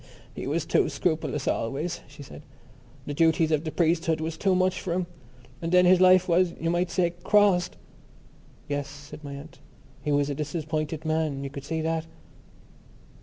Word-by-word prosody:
"He -, -, -6 dB
was -, -, -1 dB
too -, -, +2 dB
scrupulous 155 Hz, -4 st, -1 dB
always," 140 Hz, +9 st, -2 dB
she 145 Hz, +1 st, -12 dB
said. 140 Hz, -, -11 dB, 0.6 s
"The 145 Hz, -, -4 dB
duties 160 Hz, +1 st, +3 dB
of 155 Hz, 0 st, +1 dB
the 155 Hz, -, -2 dB
priesthood 165 Hz, -1 st, +1 dB
was 160 Hz, +1 st, -3 dB
too 190 Hz, +3 st, +1 dB
much 185 Hz, 0 st, +1 dB
for 175 Hz, -, -2 dB
him. 180 Hz, 0 st, 0 dB, 0.6 s
And 165 Hz, -, -3 dB
then 180 Hz, 0 st, +6 dB
his 180 Hz, 0 st, +5 dB
life 185 Hz, 0 st, +6 dB
was, 175 Hz, 0 st, +2 dB
you 165 Hz, +1 st, 0 dB
might 175 Hz, +1 st, 0 dB
say, 175 Hz, -2 st, +1 dB
crossed." 195 Hz, -3 st, +3 dB, 0.9 s
"Yes," 145 Hz, -1 st, -2 dB
said 145 Hz, +1 st, -11 dB
my 140 Hz, -1 st, -6 dB
aunt. 145 Hz, +3 st, -11 dB, 0.4 s
"He 150 Hz, -, -2 dB
was 145 Hz, 0 st, +2 dB
a -, -, -1 dB
disappointed 155 Hz, +1 st, -3 dB
man. 155 Hz, -3 st, -1 dB
You 135 Hz, -, -5 dB
could 140 Hz, -1 st, -8 dB
see 160 Hz, +2 st, -2 dB
that." 160 Hz, 0 st, -1 dB
160 Hz, 175 wpm, -26 LUFS, 145-175 Hz, 0.9 s, then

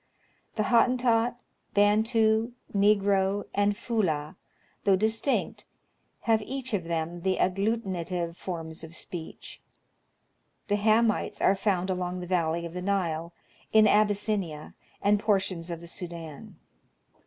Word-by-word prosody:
The 215 Hz, -, +1 dB
Hottentot, 240 Hz, 0 st, +3 dB, 0.4 s
Bantu, 220 Hz, +2 st, +3 dB, 0.2 s
Negro, 200 Hz, -1 st, +3 dB
and 205 Hz, 0 st, +1 dB
Fulah, 180 Hz, -11 st, -1 dB, 0.5 s
though 195 Hz, -, +5 dB
distinct, 220 Hz, +7 st, 0 dB, 0.6 s
have 225 Hz, -2 st, +2 dB
each 260 Hz, +2 st, -5 dB
of 185 Hz, -5 st, -1 dB
them 170 Hz, +1 st, -3 dB
the 190 Hz, +1 st, 0 dB
agglutinative 185 Hz, -4 st, -1 dB
forms 165 Hz, -3 st, -6 dB
of 160 Hz, +1 st, -9 dB
speech. 170 Hz, -2 st, -8 dB, 1.1 s
The 205 Hz, -, +2 dB
Hamites 220 Hz, +1 st, +2 dB
are -, -, +4 dB
found 190 Hz, -2 st, 0 dB
along 180 Hz, 0 st, -2 dB
the 180 Hz, -, -5 dB
valley 170 Hz, -2 st, 0 dB
of 170 Hz, -, -7 dB
the 180 Hz, -, -4 dB
Nile, 175 Hz, -4 st, -1 dB, 0.4 s
in 220 Hz, -1 st, +7 dB
Abyssinia,, 205 Hz, -6 st, +1 dB, 0.3 s
and 205 Hz, +1 st, +4 dB
portions 190 Hz, -5 st, 0 dB
of 170 Hz, -1 st, -5 dB
the 170 Hz, -, -10 dB
Sudan. 170 Hz, -4 st, -8 dB
195 Hz, 120 wpm, -28 LUFS, 170-215 Hz, 1.1 s, in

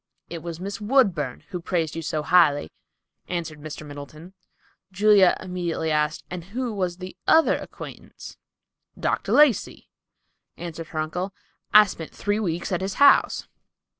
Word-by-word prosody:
"It 170 Hz, -1 st, -5 dB
was 170 Hz, 0 st, -6 dB
Miss 200 Hz, +3 st, -6 dB
Woodburn 200 Hz, -, +1 dB
who 180 Hz, -, -5 dB
praised 165 Hz, -3 st, -1 dB
you 165 Hz, -, -3 dB
so 155 Hz, -1 st, -2 dB
highly," 150 Hz, -, +3 dB, 0.6 s
answered 165 Hz, -4 st, -4 dB
Mr. 155 Hz, 0 st, -8 dB
Middleton. 150 Hz, +5 st, -10 dB, 0.6 s
Julia 200 Hz, -1 st, +5 dB
immediately 175 Hz, -3 st, -3 dB
asked, 150 Hz, +1 st, 0 dB
"And 175 Hz, -2 st, -7 dB
who 240 Hz, +4 st, -4 dB
was 180 Hz, -3 st, -2 dB
the 185 Hz, 0 st, -8 dB
other 320 Hz, 0 st, +5 dB
acquaintance?" -, -, -10 dB, 0.6 s
"Dr. -, -, -1 dB
Lacey," 290 Hz, -9 st, +3 dB, 0.7 s
answered 165 Hz, -2 st, -7 dB
her 160 Hz, -, -9 dB
uncle. 180 Hz, +5 st, -3 dB, 0.4 s
"I 210 Hz, 0 st, +9 dB
spent 165 Hz, -4 st, -7 dB
three 205 Hz, +1 st, -1 dB
weeks 175 Hz, -4 st, -2 dB
at 180 Hz, -, -1 dB
his 190 Hz, 0 st, -3 dB
house." 280 Hz, 0 st, +4 dB
175 Hz, 140 wpm, -24 LUFS, 160-200 Hz, 0.7 s, I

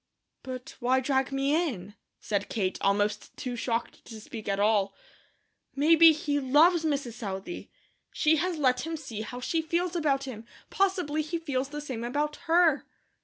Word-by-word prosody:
"But 255 Hz, -1 st, -8 dB
why 255 Hz, +1 st, +2 dB
drag 265 Hz, 0 st, 0 dB
me 275 Hz, +1 st, +1 dB
in?" 240 Hz, -, -1 dB, 0.3 s
said 200 Hz, -1 st, -2 dB
Kate, 190 Hz, -4 st, -1 dB
almost 205 Hz, +1 st, 0 dB
too 250 Hz, -1 st, -4 dB
shocked 230 Hz, 0 st, -3 dB
to 225 Hz, -2 st, -9 dB
speak 215 Hz, 0 st, -8 dB
at 195 Hz, 0 st, 0 dB
all. 205 Hz, -1 st, +2 dB, 0.8 s
"Maybe 325 Hz, +3 st, +7 dB
he 290 Hz, -2 st, -1 dB
LOVES 310 Hz, +6 st, +4 dB
Mrs. 280 Hz, -6 st, -1 dB
Southey. 200 Hz, -, -6 dB, 0.4 s
She 315 Hz, +1 st, +3 dB
has 350 Hz, +2 st, -1 dB
let 255 Hz, -4 st, +2 dB
him 325 Hz, 0 st, -3 dB
see 245 Hz, -8 st, -6 dB
how 245 Hz, +3 st, -6 dB
she 320 Hz, +6 st, -1 dB
feels 340 Hz, +2 st, -1 dB
about 285 Hz, -5 st, +1 dB
him; 245 Hz, -5 st, -7 dB, 0.3 s
possibly 360 Hz, -6 st, +1 dB
he 310 Hz, +3 st, -3 dB
feels 280 Hz, -5 st, -2 dB
the 295 Hz, +1 st, -5 dB
same 255 Hz, -6 st, -5 dB
about 295 Hz, +5 st, -1 dB
her." 330 Hz, -3 st, +4 dB
275 Hz, 165 wpm, -28 LUFS, 230-315 Hz, 0.8 s, Maybe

